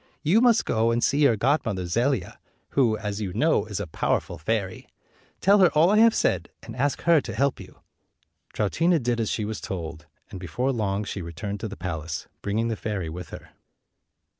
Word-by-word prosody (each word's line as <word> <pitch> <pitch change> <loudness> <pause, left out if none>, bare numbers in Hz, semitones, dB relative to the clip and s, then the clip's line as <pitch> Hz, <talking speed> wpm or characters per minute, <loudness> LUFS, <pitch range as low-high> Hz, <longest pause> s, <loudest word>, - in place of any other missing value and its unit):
You 185 +9 +4
must 240 -2 +4
go 115 +1 +1
and 115 0 0
see 140 - +2
your 140 -6 +5
godmother 115 - 0
Zelia, 115 +3 -1 0.3
who, 120 -6 +2
as 105 0 -4
you 95 -4 -3
know, - - +2
is - - -4
a - - -3
powerful - - -2
fairy. 95 +3 -2 0.5
Tell 200 +2 +5
her 185 -3 +6
all 165 +5 +5
I 215 - +4
have 225 0 +6
said, - - 0
and - - -9
ask 140 +3 0
her 170 -3 +5
to 115 -5 -7
help 140 +3 +1
you." 95 -2 -13 0.7
215 165 - +1
Troutina 140 - -4
did 120 0 0
as 110 - 0
she 110 - -2
was 110 -1 -5
told, 80 -4 -6 0.2
and 95 - -7
before 125 +9 -2
long 105 -4 -1
she 100 -1 -5
returned 100 +5 -5
to 110 - -4
the 105 - -8
palace, 80 -3 -5
bringing 110 +3 -1
the 115 - -1
fairy 100 -6 -4
with 90 +2 -7
her. - - -11
110 Hz, 200 wpm, -25 LUFS, 95-140 Hz, 0.7 s, her